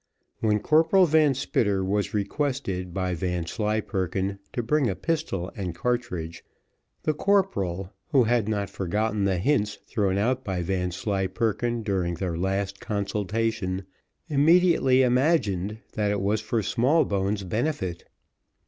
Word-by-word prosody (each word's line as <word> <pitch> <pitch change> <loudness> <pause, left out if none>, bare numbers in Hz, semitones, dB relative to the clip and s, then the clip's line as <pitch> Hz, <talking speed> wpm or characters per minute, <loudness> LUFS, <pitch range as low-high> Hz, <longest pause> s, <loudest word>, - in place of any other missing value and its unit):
When 105 -1 +2
Corporal 165 - +4
Van 155 -3 +4
Spitter 105 -7 0
was 100 +1 0
requested 105 -4 -2
by 95 0 -1
Vanslyperken 95 +2 -2
to 120 - -2
bring 140 +2 +2
a 95 - -2
pistol 150 - -2
and 90 -4 -4
cartridge, 90 -8 -2 0.6
the 155 - +1
corporal, 100 - 0
who 135 -5 +4
had 115 -2 +1
not 100 -2 -2
forgotten 105 +2 -1
the 95 -2 +1
hints 105 +1 +1
thrown 100 -4 0
out 125 +5 +1
by 95 -6 -2
Vanslyperken 95 +5 -1
during 95 -5 -1
their 90 -1 -3
last 95 +3 -2
consultation, 100 -1 -2 0.4
immediately 150 -3 +4
imagined 120 - +1 0.2
that 105 -2 0
it 100 0 0
was 105 +2 +1
for 110 +1 -1
Smallbones' 105 - +1
benefit. 105 - -2
105 Hz, 120 wpm, -26 LUFS, 95-125 Hz, 0.6 s, Corporal